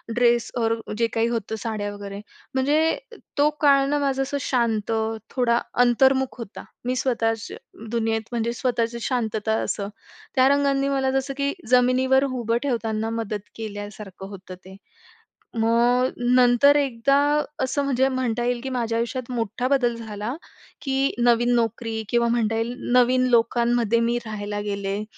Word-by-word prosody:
Dress 240 Hz, -1 st, +3 dB
or 225 Hz, -1 st, +2 dB, 0.2 s
जे 230 Hz, 0 st, +2 dB
काही 225 Hz, 0 st, +1 dB
होतं 225 Hz, -2 st, -2 dB
साड्या 210 Hz, -1 st, -3 dB
वगैरे. 200 Hz, -1 st, -7 dB, 0.3 s
म्हणजे 295 Hz, +5 st, +2 dB, 0.4 s
तो 290 Hz, +1 st, +4 dB
काळ 280 Hz, -2 st, +5 dB
ना 290 Hz, 0 st, +1 dB
माझं 275 Hz, -1 st, 0 dB
असं 280 Hz, +1 st, -3 dB
शांत, 230 Hz, -5 st, 0 dB, 0.4 s
थोडा 240 Hz, -2 st, +2 dB, 0.2 s
अंतर्मुख 265 Hz, +2 st, +3 dB
होता. 230 Hz, -3 st, -8 dB, 0.2 s
मी 250 Hz, +1 st, 0 dB
स्वतःच 225 Hz, -3 st, 0 dB, 0.4 s
दुनियेत 225 Hz, -1 st, 0 dB
म्हणजे 235 Hz, 0 st, -1 dB
स्वतःची 235 Hz, -2 st, -1 dB
शांतता 220 Hz, -3 st, -1 dB
असं. 200 Hz, -1 st, -3 dB, 0.5 s
त्या 260 Hz, -1 st, +5 dB
रंगांनी 280 Hz, -1 st, +2 dB
मला 270 Hz, -1 st, +1 dB
जसं 270 Hz, +1 st, -1 dB
की, 280 Hz, 0 st, 0 dB, 0.2 s
जमिनीवर 255 Hz, +2 st, +4 dB
उभं 240 Hz, -4 st, -1 dB
ठेवताना 225 Hz, -4 st, -1 dB
मदत 220 Hz, -3 st, -4 dB
केल्यासारखं 205 Hz, -3 st, -8 dB
होतं 190 Hz, -2 st, -10 dB
ते. 190 Hz, 0 st, -11 dB, 0.8 s
मग 240 Hz, +3 st, +3 dB, 0.3 s
नंतर 250 Hz, +3 st, +5 dB
एकदा 275 Hz, -1 st, +2 dB, 0.5 s
असं 280 Hz, +2 st, 0 dB
म्हणजे 265 Hz, -1 st, +2 dB
म्हणता 250 Hz, -3 st, -1 dB
येईल, 245 Hz, 0 st, 0 dB
की 265 Hz, -, -3 dB
माझ्या 235 Hz, -3 st, -1 dB
आयुष्यात 240 Hz, +2 st, -3 dB
मोठा 235 Hz, +1 st, -2 dB
बदल 255 Hz, -3 st, +2 dB
झाला, 220 Hz, +1 st, -5 dB, 0.5 s
की 270 Hz, 0 st, 0 dB
नवीन 240 Hz, 0 st, +3 dB
नोकरी 225 Hz, -1 st, -1 dB
किंवा 235 Hz, 0 st, +2 dB
म्हणता 225 Hz, -2 st, +1 dB
येईल, 230 Hz, +2 st, -2 dB, 0.2 s
नवीन 250 Hz, +1 st, +4 dB
लोकांमध्ये 235 Hz, -1 st, +2 dB
मी 235 Hz, +1 st, +1 dB
राहायला 205 Hz, -1 st, -4 dB
गेले. 200 Hz, 0 st, -3 dB
235 Hz, 145 wpm, -23 LUFS, 225-260 Hz, 0.8 s, काळ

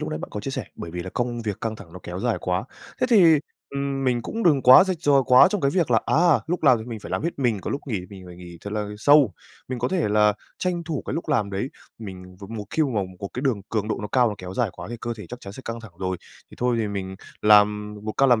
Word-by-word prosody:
lúc -, -, -3 dB
nãy -, -, -3 dB
bạn -, -, -7 dB
có -, -, -5 dB
chia -, -, -4 dB
sẻ, -, -, -4 dB
bởi 85 Hz, -, -7 dB
vì 90 Hz, +1 st, -5 dB
là 95 Hz, -, -7 dB
công 120 Hz, -1 st, -2 dB
việc 105 Hz, -3 st, -4 dB
căng 110 Hz, -1 st, -3 dB
thẳng 95 Hz, -6 st, -13 dB
ló 90 Hz, -, -8 dB
kéo 90 Hz, +2 st, -6 dB
dài 120 Hz, -1 st, 0 dB
quá. 90 Hz, +3 st, -1 dB, 0.4 s
Thế 255 Hz, -, +3 dB
thì, 170 Hz, -8 st, +7 dB, 0.3 s
ừm, 140 Hz, -1 st, -2 dB
mình 120 Hz, -2 st, +1 dB
cũng 230 Hz, -, -4 dB
đừng 150 Hz, -8 st, +4 dB
quá 130 Hz, +9 st, +9 dB
rạch 185 Hz, -2 st, -1 dB
ròi 140 Hz, -4 st, +4 dB
quá 125 Hz, +7 st, +8 dB
trong 205 Hz, -3 st, -1 dB
cái 140 Hz, -, +2 dB
việc 170 Hz, -4 st, +1 dB
là, 115 Hz, -2 st, +4 dB
à, 170 Hz, -1 st, +4 dB
lúc 175 Hz, +1 st, -2 dB
làm 130 Hz, -5 st, +6 dB
thì 110 Hz, -, -7 dB
mình 115 Hz, -3 st, -7 dB
phải -, -, -9 dB
làm -, -, -1 dB
hết 170 Hz, -2 st, -3 dB
mình, 120 Hz, -7 st, +1 dB
còn -, -, -4 dB
lúc 140 Hz, -, -2 dB
nghỉ 110 Hz, -8 st, -2 dB
mình 95 Hz, -2 st, -10 dB
phải 90 Hz, -1 st, -11 dB
nghỉ 85 Hz, -2 st, -11 dB
thật 100 Hz, -, -7 dB
là 105 Hz, -1 st, -2 dB
sâu. 145 Hz, -6 st, +5 dB, 0.4 s
Mình 130 Hz, -, -3 dB
có 125 Hz, +1 st, 0 dB
thể 175 Hz, -, 0 dB
là 105 Hz, 0 st, +4 dB, 0.3 s
tranh 175 Hz, -2 st, -1 dB
thủ 155 Hz, -4 st, -3 dB
cái -, -, -3 dB
lúc 165 Hz, -, -4 dB
làm 115 Hz, -10 st, +1 dB
đấy, 100 Hz, +7 st, -2 dB, 0.3 s
mình 90 Hz, -3 st, -9 dB
và 100 Hz, -, -8 dB
một 110 Hz, -2 st, -5 dB
khi 160 Hz, -, +1 dB
mà 145 Hz, -, +1 dB
mình 95 Hz, -1 st, -9 dB
một 100 Hz, -, -4 dB
cái 125 Hz, -, -3 dB
đường 125 Hz, -8 st, +1 dB
cường 105 Hz, -1 st, -1 dB
độ 110 Hz, -, -1 dB
nó 105 Hz, -, -4 dB
cao 125 Hz, -2 st, +3 dB
nó 105 Hz, -, -4 dB
kéo 90 Hz, 0 st, -7 dB
dài 115 Hz, -2 st, 0 dB
quá -, -, -9 dB
thì 120 Hz, -, -4 dB
cơ 120 Hz, -1 st, -3 dB
thể 105 Hz, -4 st, -9 dB
chắc 125 Hz, +5 st, -9 dB
chắn 100 Hz, -, -9 dB
sẽ 130 Hz, -, -10 dB
căng 115 Hz, 0 st, -5 dB
thẳng 115 Hz, -6 st, -12 dB
rồi. 95 Hz, -1 st, -2 dB, 0.3 s
Thì -, -, -12 dB
thôi 125 Hz, -1 st, +1 dB
thì 110 Hz, -2 st, 0 dB
mình 95 Hz, -2 st, -5 dB, 0.3 s
làm 105 Hz, 0 st, +4 dB
một 110 Hz, -, -3 dB
ca 135 Hz, -, +3 dB
làm 120 Hz, -4 st, +4 dB
115 Hz, 305 wpm, -24 LUFS, 100-140 Hz, 0.4 s, quá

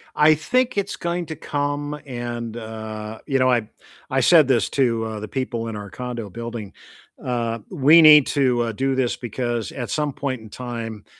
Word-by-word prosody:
I 155 Hz, +1 st, +6 dB
think 245 Hz, +10 st, 0 dB
it's 200 Hz, 0 st, -1 dB
going 170 Hz, 0 st, -3 dB
to 160 Hz, -, -5 dB
come 145 Hz, 0 st, -3 dB
and, 120 Hz, -3 st, -5 dB
uh, 110 Hz, -1 st, -7 dB
you 135 Hz, -3 st, 0 dB
know, 130 Hz, 0 st, +4 dB
I 120 Hz, -2 st, +3 dB
b 110 Hz, -, -15 dB, 0.4 s
I 135 Hz, -, +1 dB
said 155 Hz, +2 st, +6 dB
this 120 Hz, -6 st, +2 dB
to, 115 Hz, -5 st, +1 dB
uh, 110 Hz, -1 st, -5 dB
the 110 Hz, -, -6 dB
people 120 Hz, -3 st, -3 dB
in 110 Hz, -, -5 dB
our 105 Hz, -1 st, -7 dB
condo 120 Hz, 0 st, -6 dB
building, 115 Hz, -1 st, -7 dB, 0.5 s
uh, 115 Hz, -2 st, -2 dB
we 150 Hz, +5 st, +6 dB
need 150 Hz, -3 st, +9 dB
to, 125 Hz, -4 st, +2 dB
uh, 115 Hz, -, -2 dB
do 135 Hz, +5 st, -1 dB
this 130 Hz, -2 st, 0 dB
because 120 Hz, -1 st, -3 dB
at 120 Hz, -3 st, -5 dB
some 150 Hz, -2 st, -1 dB
point 130 Hz, -4 st, -3 dB
in 110 Hz, -, -12 dB
time, 115 Hz, -3 st, -6 dB
125 Hz, 195 wpm, -22 LUFS, 115-145 Hz, 0.5 s, need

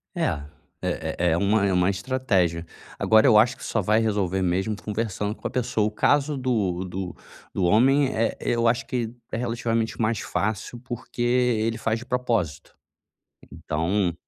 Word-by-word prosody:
É, -, -, 0 dB, 0.6 s
é -, -, -2 dB
é 85 Hz, -1 st, +3 dB
é 80 Hz, -, +2 dB
uma 100 Hz, +2 st, +2 dB
é 95 Hz, -, +1 dB
uma 90 Hz, +1 st, +3 dB
estratégia. 95 Hz, -6 st, 0 dB, 0.3 s
Agora 110 Hz, 0 st, +5 dB
eu 120 Hz, -6 st, +6 dB
acho 120 Hz, +4 st, +4 dB
que -, -, -12 dB
só 105 Hz, -, -1 dB
vai 105 Hz, +4 st, +3 dB
resolver 100 Hz, -4 st, 0 dB
mesmo 95 Hz, +4 st, 0 dB
conversando 105 Hz, -1 st, -2 dB
com -, -, -5 dB
a -, -, -5 dB
pessoa. 120 Hz, -4 st, 0 dB
O -, -, -3 dB
caso 145 Hz, +5 st, +2 dB
do 105 Hz, -9 st, 0 dB
do 90 Hz, 0 st, -5 dB, 0.4 s
do 95 Hz, -, -1 dB
homem 130 Hz, +9 st, +4 dB
é 115 Hz, +1 st, +1 dB
eu 115 Hz, 0 st, +1 dB
acho 120 Hz, +1 st, +1 dB
que 120 Hz, -3 st, -2 dB, 0.2 s
é -, -, -2 dB
relativamente 115 Hz, -1 st, -1 dB
mais 110 Hz, -1 st, +1 dB
fácil, 110 Hz, +3 st, -3 dB
porque 120 Hz, -1 st, -7 dB
ele 120 Hz, -2 st, +1 dB
faz 110 Hz, 0 st, 0 dB
de 120 Hz, -, -9 dB
propósito. 115 Hz, -, -2 dB, 0.7 s
Então 85 Hz, +4 st, -1 dB
110 Hz, 170 wpm, -25 LUFS, 95-120 Hz, 0.7 s, eu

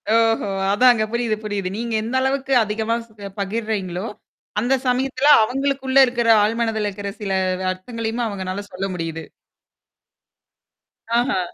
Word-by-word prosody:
ஓஹோ! 225 Hz, -2 st, +2 dB, 0.3 s
அதாங்க. 245 Hz, 0 st, +5 dB
புரியுது 235 Hz, -2 st, 0 dB
புரியுது. 205 Hz, -3 st, -2 dB
நீங்க 235 Hz, 0 st, -3 dB
எந்த 235 Hz, +4 st, -3 dB
அளவுக்கு 270 Hz, 0 st, 0 dB
அதிகமா 220 Hz, +2 st, -1 dB
ஸ் -, -, -28 dB, 0.3 s
பகிர்றீங்களோ! 200 Hz, -2 st, -2 dB, 0.5 s
அந்த 245 Hz, +5 st, +1 dB
சமயத்துல 260 Hz, +2 st, +1 dB, 0.2 s
அவுங்களுக்குள்ள 270 Hz, +2 st, -1 dB
இருக்கிற 240 Hz, -2 st, 0 dB
ஆழ்மனதுல 220 Hz, -1 st, 0 dB
இருக்கிற 200 Hz, 0 st, -6 dB
சில 195 Hz, -2 st, -2 dB, 0.4 s
அர்த்தங்களையும் 230 Hz, +4 st, -4 dB
அவுங்களால 190 Hz, -1 st, -4 dB
சொல்ல 185 Hz, +1 st, -4 dB
முடியுது. 165 Hz, -2 st, -4 dB, 2.0 s
ஆஹா. 240 Hz, -6 st, +1 dB
225 Hz, 115 wpm, -21 LUFS, 200-245 Hz, 2.0 s, அதாங்க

